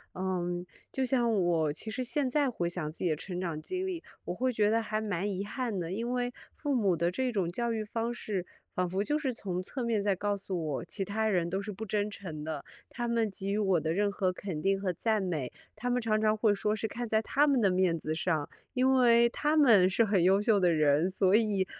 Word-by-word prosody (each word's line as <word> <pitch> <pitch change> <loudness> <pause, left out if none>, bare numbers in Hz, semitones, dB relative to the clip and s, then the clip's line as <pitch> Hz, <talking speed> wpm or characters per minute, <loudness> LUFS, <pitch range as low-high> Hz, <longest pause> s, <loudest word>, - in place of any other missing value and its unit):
嗯， 180 -1 -2 0.3
就 265 - 0
像 245 -3 +2
我 175 -7 +2
其 190 +9 -7
实 255 - -2
现 280 +2 0
在 280 +1 +2
回 175 -8 -2
想 170 -3 -3
自 155 - -14
己 175 - +2
的 - - +1
成 180 +3 -6
长 170 -4 -3
经 370 - -3
历， 360 -3 -4 0.2
我 - - -3
会 255 +7 0
觉 210 -3 +2
得 225 +1 +2
还 215 -1 -2
蛮 205 -2 -2
遗 195 +1 -3
憾 235 -1 -3
的， 170 -1 -4
因 230 +5 -2
为 245 0 -1 0.2
父 290 -2 -2
母 205 -8 +2
的 170 +2 +1
这 255 +6 -1
种 195 -6 0
教 235 +6 -1
育 225 -1 -1
方 230 +2 -2
式， 200 -6 -3 0.3
仿 180 -1 0
佛 190 +3 0
就 295 +7 0
是 270 -4 -1
从 185 -5 -3
侧 250 +7 -5
面 230 -3 +1
在 200 -1 +2
告 205 +2 -1
诉 190 -3 -4
我， 145 0 -3
其 195 +3 -3
他 220 +3 0
人 175 -4 +1
都 190 +3 -1
是 210 +1 -5
不 210 +3 -6
真 210 0 -1
诚 165 -7 -7
的， 155 -2 -4 0.3
他 240 -2 -4
们 230 -2 +1
给 195 +1 -3
予 205 - 0
我 190 -5 +2
的 160 +1 -1
任 205 +2 +1
何 190 -2 0
肯 180 -5 -5
定 195 +2 +2
和 190 -2 0
赞 215 +4 0
美， 155 -9 -2 0.3
他 245 - -2
们 245 0 +1
常 215 -2 +1
常 215 0 +3
会 215 -1 +3
说 210 +1 0
是 220 +1 -2
看 240 +3 -4
在 220 0 +2
他 285 +6 +2
们 275 -4 +3
的 200 - +4
面 180 -2 +2
子 155 0 -3
上， 160 -2 -1 0.2
因 260 0 +3
为 235 -2 +5
他 295 +5 0
们 225 -12 +6
是 195 +5 +3
很 200 -4 +2
优 190 +3 +4
秀 210 -1 +3
的 180 -2 +4
人， 155 +2 +3
所 190 0 +2
以 210 -4 +2
205 Hz, 265 characters per minute, -30 LUFS, 180-235 Hz, 0.3 s, 们